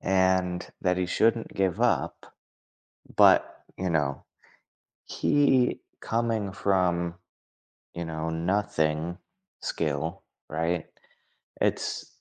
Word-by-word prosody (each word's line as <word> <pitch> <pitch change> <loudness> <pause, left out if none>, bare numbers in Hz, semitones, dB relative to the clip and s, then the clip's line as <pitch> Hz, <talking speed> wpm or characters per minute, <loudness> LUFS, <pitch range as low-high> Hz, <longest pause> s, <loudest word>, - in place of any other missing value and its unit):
And 95 -1 +2
that 90 -1 +1
he 90 -1 0
shouldn't 115 +4 +1
give 95 -3 0
up, - - 0 0.8
but, - - +5
you 95 -1 -1
know, 75 -4 0 0.8
he 135 -4 +2 0.2
coming 115 -4 -1
from, 90 -3 +1 0.8
you 85 - -4
know, 80 0 -3
nothing 80 -1 0 0.4
skill, 75 +1 -2 0.3
right? 80 +1 -1 0.7
It's, - - 0
90 Hz, 90 wpm, -27 LUFS, 80-95 Hz, 0.8 s, but